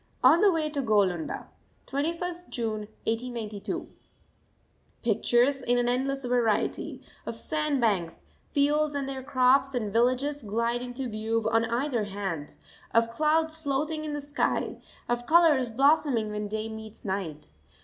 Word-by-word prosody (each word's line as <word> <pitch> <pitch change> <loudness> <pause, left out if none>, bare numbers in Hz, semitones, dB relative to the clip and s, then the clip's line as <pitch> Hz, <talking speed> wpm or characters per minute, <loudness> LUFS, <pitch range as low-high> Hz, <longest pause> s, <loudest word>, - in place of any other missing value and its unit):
ON 300 +8 +7
THE 410 -2 +6
WAY 320 -3 0
TO 295 -2 -2
GOALUNDA, 200 -8 +1 0.4
21st 335 +5 -3
June 215 -4 -3 0.2
1892. 225 -3 -3 1.2
Pictures 240 +4 +2
in 245 -1 +2
an 245 0 +2
endless 265 +2 0
variety, 240 -3 0 0.2
of - - -3
sand 300 +1 -1
banks, 190 -8 0 0.3
fields 295 +1 +2
and 275 -1 -2
their 270 -1 -4
crops, 265 0 +3
and 215 -5 -2
villages, 255 +5 +2
glide 230 +2 -1
into 250 +1 -4
view 220 0 -1
on 225 0 +3
either 235 -1 0
hand 195 -7 -4 0.4
of 230 0 +4
clouds 315 +4 +2
floating 305 +2 -1
in 305 -1 -4
the 290 - -3
sky, 290 +1 -1 0.3
of 240 0 -1
colours 310 -7 +5
blossoming 265 -3 +3
when 210 0 -3
day 215 +1 -3
meets 220 0 -9
night. 185 - -4
245 Hz, 140 wpm, -28 LUFS, 220-285 Hz, 1.2 s, ON